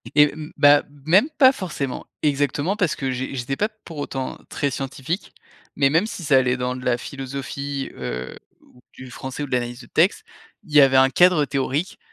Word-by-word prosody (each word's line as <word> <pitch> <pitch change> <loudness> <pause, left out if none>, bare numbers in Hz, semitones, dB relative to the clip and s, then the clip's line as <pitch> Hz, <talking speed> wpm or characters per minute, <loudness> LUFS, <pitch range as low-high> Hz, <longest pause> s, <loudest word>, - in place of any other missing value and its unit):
et 150 -1 +6
mmh, 155 +1 -8
bah, 145 0 +6 0.2
même 190 - +4
pas 260 -2 +7
forcément! 155 - -5 0.2
Exactement 145 +5 0
parce 180 -7 0
que 135 -2 -2
j'é 130 +2 -4
j'étais 130 +2 -3
pas 210 - 0 0.2
pour 165 - -9
autant 135 -2 -4
très 140 -1 -1
scientifique, 135 - -4 0.4
mais 140 -1 +3
même 165 +8 +2
si 180 - -7
ça 140 -3 +4
allait 125 -1 +2
dans 125 0 -2
de 125 - -8
la 120 -1 +2
philosophie, 140 +1 -5
heu, 60 +1 -5 0.3
ou 125 - -23
du 130 -1 -11
français 130 +3 -6
ou - - -4
de - - -15
l'analyse 120 0 -2
de 120 - -14
texte, 190 - +2 0.4
il 160 -7 -14
y 145 - +9
avait 135 -1 +5
un 130 0 +6
cadre 175 -2 +4
théorique, 140 +5 -2
140 Hz, 200 wpm, -22 LUFS, 130-155 Hz, 0.4 s, y